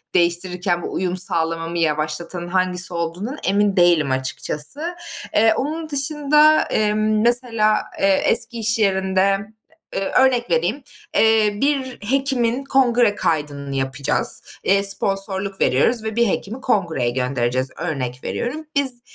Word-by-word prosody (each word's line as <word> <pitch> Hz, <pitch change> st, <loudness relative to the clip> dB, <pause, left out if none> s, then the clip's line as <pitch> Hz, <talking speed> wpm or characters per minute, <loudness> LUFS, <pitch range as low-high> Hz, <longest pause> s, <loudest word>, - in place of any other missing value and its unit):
değiştirirken 175 Hz, 0 st, +1 dB
bu -, -, -6 dB
uyum 185 Hz, 0 st, -2 dB
sağlamamı 165 Hz, -2 st, -1 dB
yavaşlatan 160 Hz, +2 st, -2 dB
hangisi 185 Hz, 0 st, 0 dB
olduğundan 175 Hz, -, -4 dB
emin 200 Hz, 0 st, +1 dB
değilim 170 Hz, -6 st, +3 dB
açıkçası. 150 Hz, -, -1 dB, 0.4 s
Eee, 220 Hz, +1 st, +4 dB
onun 315 Hz, +3 st, -4 dB
dışında, 300 Hz, +1 st, +3 dB
emm, 215 Hz, 0 st, 0 dB
mesela, 230 Hz, -3 st, +2 dB, 0.2 s
eee, 195 Hz, -, +2 dB, 0.2 s
eski 230 Hz, 0 st, +1 dB
iş 225 Hz, +1 st, +2 dB
yerinde, 190 Hz, -2 st, +1 dB, 0.7 s
ııı, 195 Hz, -, -1 dB
örnek 250 Hz, -4 st, +2 dB
vereyim, 175 Hz, -, 0 dB, 0.3 s
eee, 220 Hz, -2 st, +3 dB
bir 275 Hz, -3 st, 0 dB
hekimin 265 Hz, -2 st, 0 dB
kongre 245 Hz, -5 st, +2 dB
kaydını 145 Hz, -3 st, -2 dB
yapacağız. 135 Hz, 0 st, -1 dB, 0.2 s
Eee, 195 Hz, +1 st, +2 dB
sponsorluk 195 Hz, 0 st, -2 dB
veriyoruz 220 Hz, -, +2 dB
ve 220 Hz, 0 st, -4 dB
bir 235 Hz, -1 st, +2 dB
hekimi 220 Hz, +6 st, -3 dB
kongreye 170 Hz, -, 0 dB
göndereceğiz, 125 Hz, 0 st, -1 dB
örnek 130 Hz, -7 st, -4 dB
veriyorum. 300 Hz, +6 st, -4 dB
Biz 265 Hz, -4 st, +2 dB
195 Hz, 120 wpm, -20 LUFS, 170-240 Hz, 0.7 s, Eee